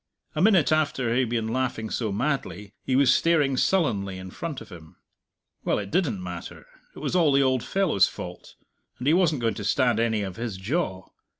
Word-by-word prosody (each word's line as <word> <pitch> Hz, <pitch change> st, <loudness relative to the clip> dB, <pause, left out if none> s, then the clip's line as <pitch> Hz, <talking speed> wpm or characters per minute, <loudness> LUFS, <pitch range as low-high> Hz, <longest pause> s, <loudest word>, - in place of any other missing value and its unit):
A -, -, -1 dB
minute 190 Hz, -6 st, +4 dB
after 140 Hz, -6 st, +1 dB
he 125 Hz, -, +2 dB
had 125 Hz, -3 st, +1 dB
been 115 Hz, -2 st, -1 dB
laughing 115 Hz, -3 st, -2 dB
so 110 Hz, -4 st, -1 dB
madly, 105 Hz, -, -3 dB
he 130 Hz, -, 0 dB
was 130 Hz, -2 st, +5 dB
staring 150 Hz, -5 st, +2 dB
sullenly 110 Hz, -, +1 dB
in 95 Hz, 0 st, -8 dB
front 160 Hz, -, -5 dB
of -, -, -12 dB
him. 85 Hz, -2 st, -13 dB, 0.7 s
Well, -, -, +1 dB
it 100 Hz, -1 st, -5 dB
didn't 125 Hz, -, 0 dB
matter; 90 Hz, -2 st, -8 dB, 0.3 s
it -, -, -14 dB
was -, -, -3 dB
all 165 Hz, -5 st, +4 dB
the 140 Hz, 0 st, +4 dB
old 130 Hz, -2 st, +1 dB
fellow's 165 Hz, -, +2 dB
fault, 90 Hz, 0 st, -9 dB, 0.4 s
and 125 Hz, -, -6 dB
he 150 Hz, -, +4 dB
wasn't 165 Hz, -7 st, +2 dB
going 115 Hz, -1 st, +1 dB
to 100 Hz, -, -6 dB
stand 115 Hz, +3 st, +2 dB
any 110 Hz, -2 st, +1 dB
of 95 Hz, -2 st, -6 dB
his 115 Hz, -4 st, -4 dB
jaw. 95 Hz, -, -2 dB
120 Hz, 200 wpm, -25 LUFS, 100-150 Hz, 0.7 s, was